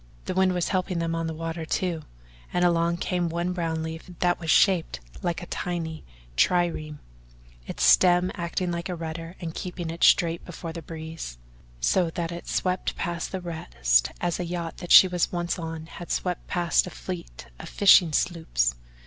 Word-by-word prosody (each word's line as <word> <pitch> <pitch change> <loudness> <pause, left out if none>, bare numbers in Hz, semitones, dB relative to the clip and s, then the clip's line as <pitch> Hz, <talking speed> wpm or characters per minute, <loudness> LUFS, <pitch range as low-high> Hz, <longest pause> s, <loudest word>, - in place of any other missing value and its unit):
The - - -2
wind 185 0 +3
was 175 - 0
helping 185 -1 -1
them 165 0 -1
on 165 0 -1
the 160 - -3
water, 165 0 -4
too, 170 0 -1 0.5
and 180 0 +2
along 170 0 +2
came 175 -1 -1
one 170 +2 -1
brown 165 -2 -2
leaf 160 +2 -7
that 175 -1 +1
was 165 -2 -5
shaped 180 - +3 0.2
like 175 0 -2
a - - -6
tiny 165 -3 -4 0.3
trireme 165 - +1 0.7
its - - -3
stem 180 0 +5
acting 175 0 -2
like 170 +1 -4
a 180 - -2
rudder 165 +1 -6
and 165 -3 -5
keeping 175 -2 -5
it 170 - -4
straight 170 -1 +4
before 170 -2 -7
the 170 - -6
breeze 160 - -7 0.4
so 170 - +2
that 170 0 -3
it 170 0 -7
swept 185 0 -1
past 170 -1 -3
the 190 - -4
rest - - +1
as 175 -1 -1
a - - -1
yacht 170 -1 -4
that 175 - -7
she 190 - +10
was 180 -1 0
once 175 0 -2
on 160 -1 -5
had 170 +1 -10
swept 180 -1 -2
past 175 -1 +2
a - - -4
fleet 175 - -7
of - - -8
fishing 185 -4 +6
sloops. 150 - +1
170 Hz, 185 wpm, -26 LUFS, 160-180 Hz, 0.7 s, she